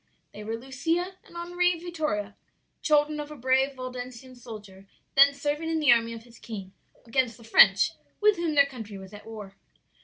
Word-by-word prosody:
They 210 Hz, -, -8 dB
were 225 Hz, +2 st, -3 dB
Lucia 330 Hz, +9 st, -2 dB
and 340 Hz, -, -13 dB
Henri 355 Hz, 0 st, +1 dB
Vittoria, 305 Hz, -, -3 dB, 0.5 s
children 300 Hz, 0 st, +2 dB
of 295 Hz, 0 st, -5 dB
a 300 Hz, -, -8 dB
brave 265 Hz, +1 st, +1 dB
Waldensian 255 Hz, 0 st, -7 dB
soldier 210 Hz, -5 st, -11 dB, 0.3 s
then 280 Hz, +1 st, +8 dB
serving 295 Hz, +3 st, -2 dB
in 325 Hz, -1 st, 0 dB
the 295 Hz, -3 st, +5 dB
army 230 Hz, -1 st, +3 dB
of 225 Hz, -1 st, -9 dB
his 240 Hz, 0 st, -17 dB
king, 195 Hz, -4 st, -8 dB, 0.3 s
against 235 Hz, 0 st, 0 dB
the 235 Hz, -, -16 dB
French, 225 Hz, -, +6 dB, 0.3 s
with 420 Hz, -1 st, +4 dB
whom 335 Hz, -3 st, -1 dB
their 280 Hz, -1 st, +7 dB
country 225 Hz, -7 st, -8 dB
was 190 Hz, +1 st, -11 dB
at 205 Hz, -, -11 dB
war. 210 Hz, -3 st, -9 dB
260 Hz, 180 wpm, -27 LUFS, 225-305 Hz, 0.5 s, then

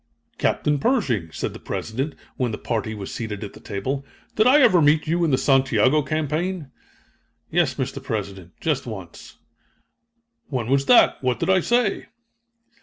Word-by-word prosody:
"Captain 150 Hz, -1 st, +1 dB
Pershing," 135 Hz, -, 0 dB
said -, -, -4 dB
the -, -, -9 dB
President, 135 Hz, +7 st, -4 dB, 0.2 s
when 125 Hz, -3 st, -1 dB
the 105 Hz, -, -4 dB
party 110 Hz, -2 st, -3 dB
was 100 Hz, -2 st, -7 dB
seated 110 Hz, -3 st, -5 dB
at 100 Hz, -, -7 dB
the -, -, -13 dB
table, 130 Hz, +8 st, -4 dB, 0.3 s
"did 215 Hz, +2 st, +4 dB
I 275 Hz, +4 st, +6 dB
ever 185 Hz, -, +5 dB
meet 150 Hz, +1 st, +4 dB
you 170 Hz, +2 st, 0 dB
in 165 Hz, -, +2 dB
the 130 Hz, -, +3 dB
Santiago 135 Hz, +1 st, +3 dB
campaign?" 155 Hz, +2 st, -2 dB, 0.8 s
"Yes, 155 Hz, -6 st, +2 dB
Mr. 135 Hz, 0 st, -4 dB
President, 100 Hz, -8 st, -5 dB
just 145 Hz, -5 st, -1 dB
once." 95 Hz, -7 st, -9 dB, 1.1 s
"When 125 Hz, -4 st, -3 dB
was 140 Hz, 0 st, +2 dB
that? 245 Hz, -, +5 dB
What 125 Hz, -3 st, 0 dB
did -, -, +1 dB
I 190 Hz, -, +5 dB
say?" 235 Hz, +2 st, 0 dB
135 Hz, 160 wpm, -23 LUFS, 110-160 Hz, 1.1 s, I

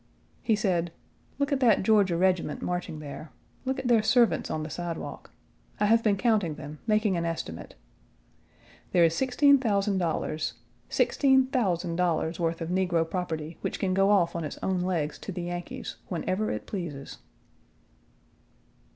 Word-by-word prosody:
He 225 Hz, -, +2 dB
said: 175 Hz, -5 st, 0 dB, 0.5 s
"Look 280 Hz, +1 st, 0 dB
at 280 Hz, -, +2 dB
that 230 Hz, -7 st, +4 dB
Georgia 195 Hz, -4 st, +3 dB
regiment 180 Hz, -4 st, +1 dB
marching 175 Hz, -3 st, -3 dB
there; 150 Hz, +1 st, -8 dB, 0.4 s
look 265 Hz, +1 st, -1 dB
at 255 Hz, -, -3 dB
their 235 Hz, -3 st, +5 dB
servants 235 Hz, +2 st, +3 dB
on 155 Hz, -, -2 dB
the 155 Hz, -, -5 dB
sidewalk. 175 Hz, 0 st, -5 dB, 0.5 s
I 210 Hz, -, +3 dB
have 225 Hz, +2 st, +4 dB
been 210 Hz, -3 st, +2 dB
counting 205 Hz, -8 st, +1 dB
them, 150 Hz, 0 st, -9 dB
making 215 Hz, -3 st, +2 dB
an 170 Hz, -, -1 dB
estimate. 85 Hz, -, -5 dB, 1.2 s
There 175 Hz, -, +5 dB
is 165 Hz, -1 st, +4 dB
$16,000 205 Hz, -, +2 dB, 0.4 s
sixteen 265 Hz, -2 st, +3 dB
thousand 185 Hz, -10 st, 0 dB
dollars' 170 Hz, -2 st, 0 dB
worth 165 Hz, 0 st, -1 dB
of 165 Hz, -, -3 dB
negro 180 Hz, -3 st, +1 dB
property 165 Hz, -3 st, -4 dB
which -, -, -3 dB
can 185 Hz, -1 st, 0 dB
go 195 Hz, +1 st, +3 dB
off 185 Hz, -5 st, +3 dB
on 170 Hz, -, -2 dB
its 150 Hz, -, -5 dB
own 190 Hz, -1 st, 0 dB
legs 170 Hz, -5 st, -1 dB
to -, -, -6 dB
the 180 Hz, -1 st, -4 dB
Yankees 175 Hz, 0 st, -5 dB
whenever 185 Hz, +4 st, -1 dB
it -, -, -4 dB
pleases." 160 Hz, -8 st, -6 dB
180 Hz, 150 wpm, -27 LUFS, 165-215 Hz, 1.2 s, their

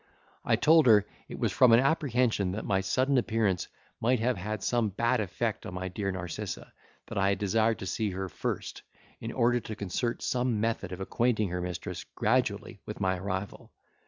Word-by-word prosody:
I -, -, +3 dB
told 160 Hz, -2 st, +5 dB
her, 105 Hz, -3 st, +6 dB, 0.2 s
it -, -, -6 dB
was -, -, 0 dB
from 125 Hz, -3 st, +6 dB
an 115 Hz, -, +8 dB
apprehension 125 Hz, -, +1 dB
that 105 Hz, -, -4 dB
my 95 Hz, -1 st, +1 dB
sudden 130 Hz, +7 st, +2 dB
appearance 110 Hz, -6 st, 0 dB, 0.3 s
might 125 Hz, +2 st, +2 dB
have 125 Hz, +3 st, +1 dB
had 105 Hz, +2 st, -4 dB
some 120 Hz, -3 st, +1 dB
bad 120 Hz, +5 st, +1 dB
effect 110 Hz, +3 st, -2 dB
on 90 Hz, -, -7 dB
my 95 Hz, +1 st, -3 dB
dear 100 Hz, +2 st, -3 dB
Narcissa, 90 Hz, -3 st, -5 dB, 0.3 s
that -, -, -4 dB
I 95 Hz, 0 st, +3 dB
had 100 Hz, -, +1 dB
desired 110 Hz, +2 st, +2 dB
to -, -, -6 dB
see 105 Hz, +3 st, -1 dB
her 95 Hz, 0 st, -4 dB
first, -, -, -4 dB, 0.4 s
in 115 Hz, -, -5 dB
order 120 Hz, 0 st, +2 dB
to 110 Hz, -2 st, -7 dB
concert 105 Hz, +4 st, -2 dB
some 125 Hz, -3 st, 0 dB
method 110 Hz, -4 st, -1 dB
of 90 Hz, +1 st, -6 dB
acquainting 110 Hz, 0 st, +1 dB
her 90 Hz, 0 st, -3 dB
mistress 90 Hz, -1 st, -5 dB
gradually -, -, 0 dB
with -, -, -7 dB
my 95 Hz, -1 st, 0 dB
arrival. 95 Hz, +1 st, -5 dB
110 Hz, 190 wpm, -29 LUFS, 95-120 Hz, 0.4 s, an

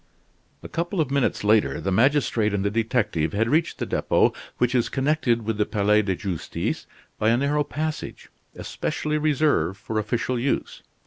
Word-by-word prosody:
A -, -, -6 dB
couple 175 Hz, +3 st, -3 dB
of 145 Hz, -4 st, 0 dB
minutes 140 Hz, -6 st, 0 dB
later, 105 Hz, +1 st, +3 dB
the 95 Hz, -, -2 dB
magistrate 115 Hz, -2 st, +2 dB
and 100 Hz, 0 st, -1 dB
the 100 Hz, -, +1 dB
detective 105 Hz, -8 st, 0 dB
had 110 Hz, +3 st, +1 dB
reached 155 Hz, +6 st, +1 dB
the -, -, -3 dB
Depot, -, -, +2 dB, 0.2 s
which 125 Hz, +1 st, +1 dB
is 120 Hz, -2 st, +1 dB
connected 135 Hz, -4 st, +1 dB
with 110 Hz, 0 st, -3 dB
the 105 Hz, -, +3 dB
Palais 105 Hz, 0 st, +3 dB
de 95 Hz, -3 st, -1 dB
Justice 90 Hz, -3 st, -4 dB, 0.3 s
by 110 Hz, -, +3 dB
a 115 Hz, -, +3 dB
narrow 145 Hz, +3 st, +1 dB
passage, 155 Hz, +2 st, -5 dB, 0.3 s
especially 150 Hz, 0 st, -3 dB
reserved 150 Hz, -9 st, +1 dB
for 110 Hz, +2 st, -3 dB
official 120 Hz, +3 st, -1 dB
use. 135 Hz, +3 st, -2 dB
120 Hz, 170 wpm, -24 LUFS, 105-145 Hz, 0.3 s, later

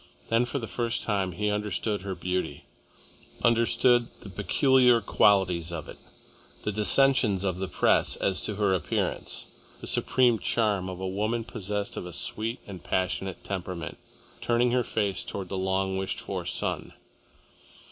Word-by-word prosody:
Then 115 Hz, +2 st, +3 dB
for 130 Hz, -, -3 dB
the 115 Hz, -4 st, -4 dB
first 120 Hz, 0 st, -1 dB
time 100 Hz, -4 st, 0 dB
he 105 Hz, +4 st, 0 dB
understood 105 Hz, 0 st, -1 dB
her 95 Hz, -1 st, -4 dB
beauty, 90 Hz, -6 st, -3 dB, 0.8 s
understood 120 Hz, +1 st, +4 dB
the 100 Hz, -, -10 dB
peculiar 125 Hz, +4 st, +4 dB
qualities 90 Hz, -6 st, +3 dB
of 80 Hz, -3 st, -5 dB
it, -, -, -11 dB, 0.6 s
the 105 Hz, -, -1 dB
dissensions 105 Hz, -1 st, +3 dB
of 95 Hz, -2 st, -1 dB
the 95 Hz, -, -2 dB
Press -, -, +2 dB
as 95 Hz, -1 st, -1 dB
to 105 Hz, -, -2 dB
her 100 Hz, -2 st, +2 dB
appearance, 90 Hz, -5 st, -2 dB, 0.3 s
the -, -, -8 dB
supreme 120 Hz, -3 st, +4 dB
charm 105 Hz, -5 st, 0 dB
of 90 Hz, -1 st, -6 dB
a 95 Hz, -, -3 dB
woman 110 Hz, +5 st, -1 dB
possessed 105 Hz, -1 st, -4 dB
of 90 Hz, -, -4 dB
a 90 Hz, -, -8 dB
sweet 110 Hz, +7 st, -2 dB
and 95 Hz, -4 st, -9 dB
passionate 95 Hz, 0 st, -2 dB
temperament, 90 Hz, -3 st, -5 dB, 0.4 s
turning 120 Hz, +1 st, +2 dB
her 125 Hz, 0 st, +2 dB
face 100 Hz, -4 st, -1 dB
towards 95 Hz, -3 st, -5 dB
the -, -, -3 dB
long 95 Hz, 0 st, 0 dB
wished 95 Hz, 0 st, -2 dB
for -, -, -4 dB
sun. -, -, -2 dB
100 Hz, 155 wpm, -27 LUFS, 95-115 Hz, 0.8 s, understood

